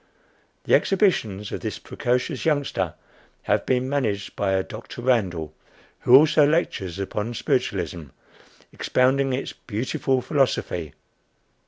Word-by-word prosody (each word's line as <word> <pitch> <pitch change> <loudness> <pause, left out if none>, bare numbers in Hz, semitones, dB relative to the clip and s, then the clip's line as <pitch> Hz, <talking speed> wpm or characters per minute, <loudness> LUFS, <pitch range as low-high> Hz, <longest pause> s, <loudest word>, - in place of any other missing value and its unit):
The - - 0
exhibitions 115 - +2
of - - -3
this - - -4
precocious 125 +3 -2
youngster 140 - 0 0.5
have - - 0
been 130 0 +1
"managed" 110 -8 -2
by 100 -1 0
a 95 0 +1
Dr. - - -9
Randall, 90 - 0 0.5
who 125 - +6
also 150 +2 +6
lectures 145 - 0
upon 105 +4 -3
Spiritualism, 85 -6 -1 0.7
expounding 135 +1 +2
its 130 +1 -3
"beautiful 130 +4 -1
philosophy." 125 - 0
125 Hz, 115 wpm, -24 LUFS, 100-140 Hz, 0.7 s, who